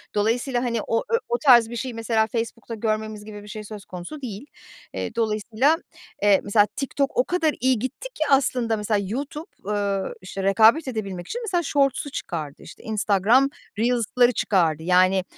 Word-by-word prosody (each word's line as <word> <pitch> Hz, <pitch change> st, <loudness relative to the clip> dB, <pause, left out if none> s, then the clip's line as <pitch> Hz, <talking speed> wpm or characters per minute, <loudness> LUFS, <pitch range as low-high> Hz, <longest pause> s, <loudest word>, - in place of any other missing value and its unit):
Dolayısıyla, 240 Hz, +4 st, 0 dB
hani, 235 Hz, -3 st, -1 dB
o 230 Hz, -, +1 dB
ö 465 Hz, -, +3 dB
o 480 Hz, -, +1 dB
tarz 240 Hz, -, +6 dB
bir 240 Hz, -, -6 dB
şeyi, 250 Hz, +1 st, -4 dB
mesela, 225 Hz, -1 st, +1 dB
Facebook'ta 230 Hz, 0 st, -4 dB
görmemiz 215 Hz, -1 st, -3 dB
gibi 210 Hz, -1 st, -9 dB
bir -, -, -13 dB
şey 210 Hz, 0 st, -7 dB
söz 210 Hz, -1 st, -9 dB
konusu 185 Hz, +12 st, -8 dB
değil. 230 Hz, +1 st, -6 dB, 0.5 s
Eee, 230 Hz, -, -4 dB
dolayısıyla, 225 Hz, +6 st, +1 dB, 0.5 s
eee, 205 Hz, -2 st, +5 dB
mesela, 205 Hz, 0 st, +4 dB
TikTok 275 Hz, 0 st, -2 dB
o 250 Hz, -, +5 dB
kadar 325 Hz, -1 st, +1 dB
iyi 255 Hz, -1 st, +2 dB
gitti 275 Hz, -, -5 dB
ki 310 Hz, -, -1 dB
aslında, 250 Hz, -4 st, +2 dB
mesela, 210 Hz, 0 st, 0 dB
YouTube, 285 Hz, -, -5 dB, 0.2 s
ııı, 200 Hz, -1 st, -1 dB
işte, 190 Hz, +1 st, -6 dB
rekabet 220 Hz, +10 st, +5 dB
edebilmek 200 Hz, -7 st, -4 dB
için, 480 Hz, -, -4 dB
mesela, 360 Hz, -6 st, 0 dB
shorts'u 280 Hz, 0 st, +1 dB
çıkardı, 155 Hz, -, -5 dB
işte, -, -, -13 dB
Instagram 220 Hz, +5 st, +3 dB, 0.3 s
Reels'ları 245 Hz, +1 st, +3 dB
çıkardı. 165 Hz, -8 st, +1 dB
Yani, 185 Hz, +2 st, +4 dB
225 Hz, 170 wpm, -24 LUFS, 205-260 Hz, 0.5 s, tarz